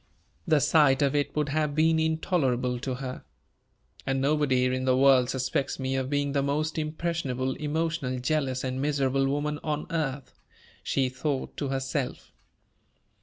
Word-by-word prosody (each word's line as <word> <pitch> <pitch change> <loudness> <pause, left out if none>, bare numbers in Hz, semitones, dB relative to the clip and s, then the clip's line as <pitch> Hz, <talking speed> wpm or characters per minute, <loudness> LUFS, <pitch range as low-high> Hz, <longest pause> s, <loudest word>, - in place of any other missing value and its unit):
The 155 -2 +4
sight 150 -2 +4
of 140 0 +2
it 145 -1 -1
would 150 -1 0
have 150 0 0
been 160 +1 +3
intolerable 135 -6 0
to 130 0 -3
her. 130 0 -6 0.8
"And 135 0 -1
nobody 135 -2 +2
in 130 0 0
the 130 -1 +3
world 130 -2 +5
suspects 130 +1 -1
me 130 0 -2
of 130 -1 -1
being 145 0 0
the 140 0 +1
most 155 +3 -1
impressionable, 155 -5 -2
emotional, 155 -3 -2
jealous, 130 0 -1
and 130 0 -2
miserable 135 -2 +1
woman 145 +2 -1
on 150 -1 -2
earth," 145 -5 -3 0.4
she 135 -2 0
thought 135 +2 -3
to 145 - -2
herself. 135 0 -3
140 Hz, 150 wpm, -27 LUFS, 130-150 Hz, 0.8 s, world